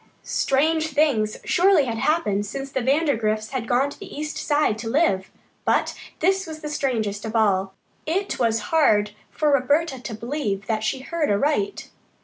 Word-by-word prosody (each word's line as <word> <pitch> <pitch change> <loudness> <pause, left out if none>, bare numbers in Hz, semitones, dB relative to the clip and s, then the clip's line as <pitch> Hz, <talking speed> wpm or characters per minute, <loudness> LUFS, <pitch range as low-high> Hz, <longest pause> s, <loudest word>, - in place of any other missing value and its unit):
Strange 315 +4 +1
things 275 -8 +1
surely 360 -5 +4
had 230 -2 -3
happened 210 -11 +1
since 270 +6 -6
the 265 - -1
Vandergrifts 235 -6 +1
had 255 -4 -3
gone 250 +4 +2
to - - -12
the - - -10
East 305 +1 -5
Side 295 -7 +1
to 225 0 -4
live, 225 - +1 0.3
but - - +1 0.3
this 380 +2 +2
was 310 -1 -8
the 300 - -5
strangest 225 -8 -1
of 220 0 -5
all. 195 -3 +2 0.3
It 385 +5 -1
was 225 -3 0
hard 210 -10 +4 0.2
for 300 -1 +1
Roberta 280 +1 +1
to 230 - -6
believe 225 -5 -3
that 215 0 -1
she 260 +4 -1
heard 320 +2 -2
aright. 295 - 0
265 Hz, 165 wpm, -23 LUFS, 215-310 Hz, 0.3 s, surely